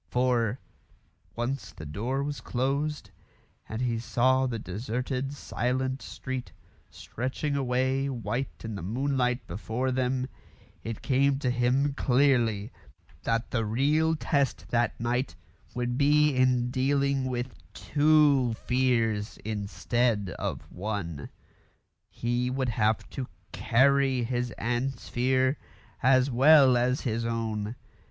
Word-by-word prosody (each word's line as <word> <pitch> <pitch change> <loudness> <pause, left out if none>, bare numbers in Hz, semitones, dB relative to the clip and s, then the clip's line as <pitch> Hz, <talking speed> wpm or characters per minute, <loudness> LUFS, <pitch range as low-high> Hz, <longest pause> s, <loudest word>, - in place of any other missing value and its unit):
For, 125 -2 +1 0.8
once 120 -5 -3
the 80 - -9
door 120 - -2
was 145 0 -4
closed, 135 -2 -2 0.6
and 110 +3 -3
he 115 -2 0
saw 130 +3 +2
the 120 -2 -3
deserted 125 +7 -3
silent 130 -1 -2
street 130 -1 -6 0.4
stretching 130 +4 -4
away 130 +1 0
white 120 +1 -4
in 110 - -4
the 100 - -5
moonlight 125 +4 0
before 110 +8 -2
them, 130 0 0 0.6
it 115 -1 -6
came 140 0 +2
to 130 -3 0
him 125 +4 +1
clearly 125 -6 +2 0.5
that 115 +1 -1
the 115 -3 0
real 145 +9 +2
test 140 -3 -1
that 120 -1 0
night 125 +3 -1 0.4
would 120 0 -1
be 150 0 +4
in 125 -1 +2
dealing 140 +1 +1
with 125 -1 -3 0.2
two 145 -5 +3
fears 115 -4 0
instead 105 +1 -1
of - - -3
one. 90 -7 -4 0.8
He 120 +1 -1
would 130 0 -1
have 110 -1 +1
to 130 -2 -4 0.2
carry 130 +6 +3
his 120 +1 -1
aunt's 120 +2 -2
fear 130 +3 +2 0.4
as 130 +1 +4
well 135 +1 +7
as 125 +2 +1
his 115 -2 -1
own. 115 -1 -2
125 Hz, 115 wpm, -28 LUFS, 115-135 Hz, 0.8 s, well